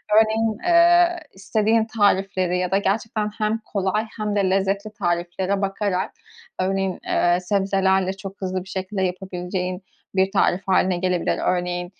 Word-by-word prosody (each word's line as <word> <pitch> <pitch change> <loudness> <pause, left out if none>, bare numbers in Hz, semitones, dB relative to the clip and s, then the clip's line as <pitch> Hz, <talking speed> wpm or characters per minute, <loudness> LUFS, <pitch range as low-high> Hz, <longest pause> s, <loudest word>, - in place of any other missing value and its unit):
Örneğin, 220 0 +3
eee, 345 0 +5
istediğin 220 +3 +1
tarifleri 195 -4 +1
ya 180 0 -1
da 195 - +3
gerçekten 210 +2 -1
hem 215 0 0
kolay 210 -1 -2
hem 210 -1 -2
de 195 -2 +2
lezzetli 195 +2 0
tariflere 175 +2 -1
bakarak 195 -1 -1 0.5
örneğin, 190 0 -1
eee, 175 0 +2
sebzelerle 190 0 +1
çok 195 0 -10
hızlı 185 -1 -2
bir 190 - -15
şekilde 190 +1 -3
yapabileceğin 180 0 -3 0.3
bir 190 0 +2
tarif 180 -1 +2
hâline 185 -1 +2
gelebilir. 180 -1 0
Örneğin, 180 0 0
195 Hz, 135 wpm, -22 LUFS, 185-210 Hz, 0.5 s, eee